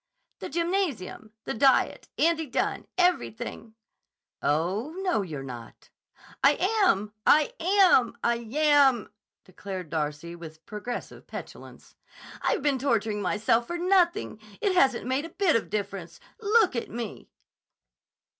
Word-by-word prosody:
"The - - -6
gymnasium. 335 - -2
The - - -3
diet. 270 +4 +2
Andy 325 -1 +2
Dunne. 245 - -2
Everything." 240 -10 -1 0.7
"Oh, 185 - -1
no, 360 - +1
you're 155 -8 -6
not." 120 -3 -10 0.5
"I - - +7 0.3
am! 210 - +1
I 300 -1 +5
am! 365 -6 +4
I 235 - +3
yam!" 265 0 +3 0.3
declared 185 -2 -8
Darcy 155 +1 -3
with 160 -2 -12
progressive 215 +3 -7
petulance. - - -10 0.5
"I've - - 0
been 285 -3 +1
torturing 225 -5 0
myself 220 +4 +1
for 345 - -3
nothing. 350 - +1 0.2
It 395 - +1
hasn't 265 -10 +3
made 260 +4 -1
a - - -8
bit 355 0 +1
of 230 - 0
difference. 195 -5 -5 0.2
Look 430 - +3
at 235 - -3
me!" 230 -2 -7
235 Hz, 125 wpm, -27 LUFS, 200-330 Hz, 0.7 s, I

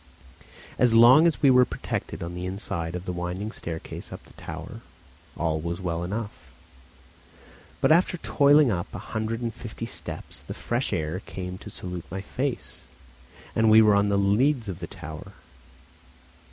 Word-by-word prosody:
As 120 -2 +5
long 130 +8 +8
as 160 - -1
we 135 - +7
were 125 0 +7
protected 125 - -4
on 85 +1 -5
the 90 +1 -4
inside 85 -3 -3
of 90 +1 -5
the 90 - -3
winding 90 +4 -4
staircase 80 -7 -7
up - - -8
the - - -19
tower, - - -8 0.6
all 80 -1 0
was 85 +2 -3
well 85 -2 -2
enough; 100 - -5 1.3
but - - +4
after 180 +2 +4
toiling 145 -4 +4
up 85 -3 -2
a - - -9
hundred 110 +2 -2
and 115 -1 -2
fifty - - -7
steps - - -7
the - - -8
fresh 120 +2 -2
air 80 +2 -2
came 90 0 -6
to - - -9
salute 90 -4 -6
my 95 +2 -4
face, 130 +5 -4 0.7
and 110 0 +4
we 110 +1 +8
were 105 -1 +5
on 100 0 +3
the 100 0 +2
leads 115 +6 +2
of 95 -3 -5
the 85 - -5
tower. 80 +7 -9
100 Hz, 165 wpm, -26 LUFS, 90-120 Hz, 1.3 s, long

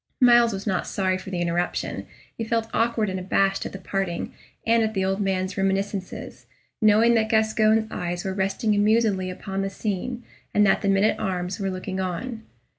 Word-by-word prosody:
Myles 240 -2 +6
was 195 -1 -5
not 190 -4 -1
sorry 185 -1 0
for 190 - -9
the 180 -2 -2
interruption; 175 +1 -2 0.3
he 230 - -4
felt 225 0 -1
awkward 230 -1 +1
and 190 -1 -3
abashed 195 +1 +1
at - - -9
the - - -7
parting, 190 -2 -3 0.3
and 230 0 +4
at 220 -1 -1
the 190 -1 +1
old 195 +2 0
man's 190 -1 -1
reminiscences, 195 0 -2 0.3
knowing 220 +2 +5
that 220 -1 +2
Gascoyne's 220 0 +3
eyes 175 +1 -3
were 190 - -1
resting 195 +3 0
amusedly 205 -2 +2
upon 190 +1 -4
the 195 - -1
scene, 220 +5 -4 0.3
and 210 0 +5
that 195 - +3
the 200 - 0
men 195 0 +3
at 215 - +2
arms 185 -2 -2
were 195 -1 -1
looking 185 0 -4
on. 205 +6 -3
195 Hz, 190 wpm, -24 LUFS, 190-220 Hz, 0.3 s, Myles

